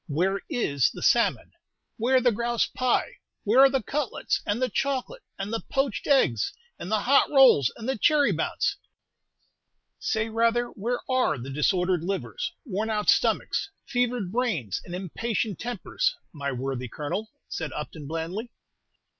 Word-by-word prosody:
Where 180 +6 0
is 140 - +1
the - - -8
salmon - - +2 0.5
where 255 +3 +3
the 250 -1 +3
grouse 235 +1 0
pie 255 -1 -1 0.2
where 225 +4 +3
are 270 0 +9
the 270 -3 0
cutlets 285 -1 -1
and 205 +3 0
the 255 - +2
chocolate 275 - -2 0.2
and 200 +3 -4
the 225 - 0
poached 270 -4 -1
eggs 125 - +3 0.3
and 180 - -6
the 215 -1 +2
hot 275 +3 +4
rolls, 265 - +6
and 230 - -7
the 265 -4 -1
cherry 295 +5 +4
bounce?" - - -1 1.2
"Say, 220 0 0
rather, 230 +2 +1
where 240 +4 -3
are 255 - +2
the 130 +3 -7
disordered 180 +4 +1
livers, 195 - -3
worn 220 -1 -2
out 210 -1 0
stomachs, - - +1 0.2
fevered 245 -7 -1
brains, 205 - -1
and 175 - -7
impatient 200 +2 -2
tempers, 240 -4 -1 0.2
my 140 -3 -3
worthy 130 0 -3
Colonel?" 150 - -4 0.2
said 160 -2 -4
Upton, 150 -1 -6
blandly. 165 - -4
220 Hz, 150 wpm, -26 LUFS, 170-250 Hz, 1.2 s, are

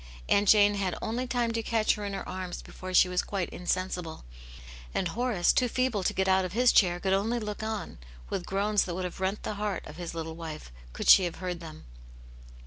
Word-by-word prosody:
Aunt 200 -1 +3
Jane 205 -1 +6
had 195 -3 -2
only 245 +3 -3
time 240 -2 0
to 230 0 -1
catch 225 -1 +2
her 210 - -6
in 200 - -4
her 195 - -5
arms 185 -1 -5
before 185 0 -8
she 185 - +6
was 180 0 0
quite 195 -4 -3
insensible; 180 - -3 0.7
and 180 - 0
Horace, 225 -2 +1
too 250 - +2
feeble 255 -3 0
to - - +3
get 190 0 0
out 190 0 +4
of 185 -1 -4
his 245 +2 +4
chair, 175 -3 +4
could 190 +1 0
only 215 +5 +1
look 210 -1 -5
on, 220 - -4 0.3
with 180 - -3
groans 200 +3 +1
that 175 - -4
would 185 - -3
have 180 - -6
rent 190 +2 -2
the - - -3
heart 210 -2 -2
of 150 - -10
his 175 -1 -6
little 160 -1 -4
wife, 160 - -8 0.2
could - - -5
she 190 - +8
have 175 - -3
heard 180 -1 -4
them. 160 -2 -10
190 Hz, 225 wpm, -28 LUFS, 180-215 Hz, 0.7 s, she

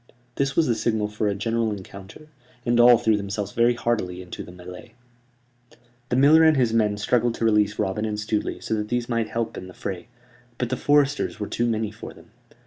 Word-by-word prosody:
This 135 +1 -1
was 165 - +3
the 125 - +2
signal 110 -1 -1
for 105 0 -2
a 100 - 0
general 115 +2 -1
encounter, 100 +8 -10 0.4
and 120 0 +2
all 120 0 +8
threw 110 -2 +2
themselves 100 0 -4
very 120 +1 +2
heartily 110 -7 -2
into 90 -1 -8
the - - -10
mêlée. 90 +5 -11 1.2
The 125 - 0
miller 145 +5 +6
and 160 -2 +5
his 120 -4 +2
men 105 -2 +1
struggled 120 +2 +1
to 115 - -2
release 105 -2 +2
Robin 105 0 -1
and 105 -1 -3
Stuteley 105 0 -2
so - - -3
that 105 -1 -1
these 120 -1 -1
might 115 -2 -1
help 115 -1 -3
in 90 - -10
the 95 - -13
fray; 95 +1 -6 0.5
but 125 - -2
the 130 - -1
foresters 145 -2 +1
were 105 - -3
too 120 - -1
many 110 -2 -1
for 110 - -10
them. - - -18
110 Hz, 210 wpm, -24 LUFS, 105-120 Hz, 1.2 s, all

